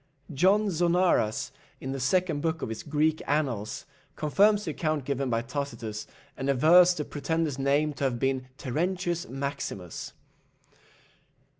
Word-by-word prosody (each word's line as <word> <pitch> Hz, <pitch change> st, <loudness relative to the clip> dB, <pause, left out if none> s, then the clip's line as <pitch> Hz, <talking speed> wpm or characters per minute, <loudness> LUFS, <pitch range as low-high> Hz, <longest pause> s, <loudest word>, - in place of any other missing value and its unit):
John 195 Hz, +8 st, +3 dB
Zonaras, 170 Hz, -9 st, +2 dB, 0.3 s
in 130 Hz, -, -5 dB
the 135 Hz, -, -3 dB
second 160 Hz, +3 st, +1 dB
book 160 Hz, +1 st, -1 dB
of -, -, -3 dB
his 115 Hz, -, -5 dB
Greek 155 Hz, +1 st, +1 dB
annals, 130 Hz, -8 st, -1 dB, 0.3 s
confirms 205 Hz, +7 st, +3 dB
the -, -, -2 dB
account 155 Hz, -3 st, -1 dB
given 140 Hz, -1 st, -1 dB
by 115 Hz, -1 st, 0 dB
Tacitus, 120 Hz, -5 st, -5 dB, 0.3 s
and 135 Hz, +1 st, -3 dB
avers 175 Hz, +7 st, +6 dB
the 150 Hz, -, -3 dB
pretender's 150 Hz, -1 st, -2 dB
name 145 Hz, +2 st, +2 dB
to 140 Hz, -, -2 dB
have 125 Hz, -3 st, 0 dB
been 130 Hz, 0 st, -1 dB
Terentius 175 Hz, +5 st, -2 dB
Maximus. 135 Hz, -, -5 dB
145 Hz, 135 wpm, -28 LUFS, 135-170 Hz, 0.3 s, avers